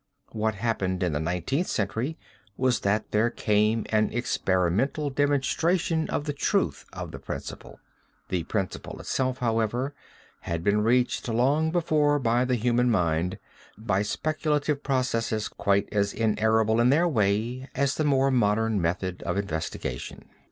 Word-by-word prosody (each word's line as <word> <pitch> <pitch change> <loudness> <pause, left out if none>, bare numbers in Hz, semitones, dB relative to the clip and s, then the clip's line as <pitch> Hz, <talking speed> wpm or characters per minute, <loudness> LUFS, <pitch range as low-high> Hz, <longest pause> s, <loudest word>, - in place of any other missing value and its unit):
What 110 0 -1
happened 100 -4 -1
in 90 - +1
the 75 - 0
Nineteenth 90 - -1
Century 115 - -2 0.4
was 130 -2 +2
that 105 +2 0
there 110 +3 +3
came 105 0 +1
an 110 -1 +3
experimental 120 - 0
demonstration 160 +4 +1
of - - -1
the 145 - -2
truth 140 - 0
of - - -6
the - - -8
principle. - - -7 0.5
The 90 -2 0
principle 95 -2 -4
itself, 130 -1 -1
however, 120 +3 0 0.5
had 85 -1 -4
been 105 +2 +2
reached 120 +2 +1
long 140 +7 +2
before 155 -3 +2
by 120 -1 +2
the 125 0 +1
human 120 +1 +2
mind 90 -4 +1 0.4
by 100 -3 0
speculative 150 +4 -1
processes 115 -6 0
quite 100 0 0
as 100 -1 +1
inerrable 110 +1 +2
in 120 - +4
their 165 +6 +4
way 115 +1 0
as 140 0 +1
the 155 - -1
more 135 -2 +3
modern 110 -3 +2
method 90 +2 -2
of - - -2
investigation. 80 -6 -4
115 Hz, 140 wpm, -26 LUFS, 100-135 Hz, 0.5 s, in